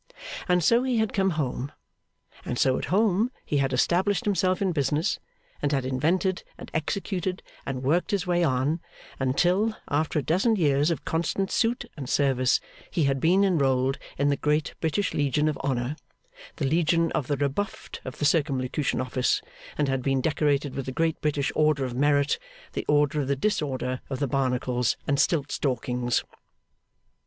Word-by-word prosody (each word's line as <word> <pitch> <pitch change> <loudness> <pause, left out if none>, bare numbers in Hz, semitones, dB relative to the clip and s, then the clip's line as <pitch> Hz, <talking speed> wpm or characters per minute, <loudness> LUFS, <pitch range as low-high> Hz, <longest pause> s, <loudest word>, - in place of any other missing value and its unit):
And 180 -1 +3
so 235 +8 +5
he 255 -2 0
had 220 -1 0
come 195 -1 +2
home. 135 -1 -2 0.7
And 120 - -3
so 130 0 +3
at - - -3
home 210 +3 +2 0.2
he 145 - 0
had 135 -1 +1
established 185 - +2
himself 185 -2 +1
in 195 -2 +1
business, 150 +3 0 0.4
and 145 - 0
had 135 -3 0
invented 170 +9 0
and - - -10
executed, 185 +3 -2 0.2
and 130 -1 -3
worked 165 +9 +1
his 200 -4 0
way 175 -1 +2
on, 140 +2 +1 0.4
until, 180 +12 +2
after 155 +2 0
a 150 - +1
dozen 195 - +2
years 145 -4 +2
of 165 - -2
constant 170 +4 -1
suit 240 +2 +1
and 135 -4 -6
service, 130 -3 +2 0.3
he 165 - 0
had 135 -1 +1
been 180 +7 +4
enrolled 135 -7 +2 0.2
in 140 +1 +2
the 140 - +1
Great 150 +1 0
British 175 +5 0
Legion 145 +1 +1
of 155 - 0
Honour, 130 0 -1 0.6
the - - -2
Legion 165 +3 +2
of 130 - -1
the 145 - 0
Rebuffed 145 +9 -3
of 130 - -7
the 145 - -1
Circumlocution 140 -2 +1
Office, 130 0 +1 0.4
and 150 - +1
had 135 -1 0
been 135 +1 +1
decorated 145 -1 +1
with 135 -2 -4
the - - -2
Great 165 +4 0
British 145 -2 0
Order 150 -3 +2
of 125 - -4
Merit, 145 +2 +2 0.3
the - - -4
Order 150 0 +3
of 135 - -3
the 140 - +1
Disorder 135 -6 -1
of 135 - -2
the 145 - 0
Barnacles 125 -2 0
and 140 -1 +1
Stiltstalkings. 125 -5 0
145 Hz, 170 wpm, -26 LUFS, 135-175 Hz, 0.7 s, so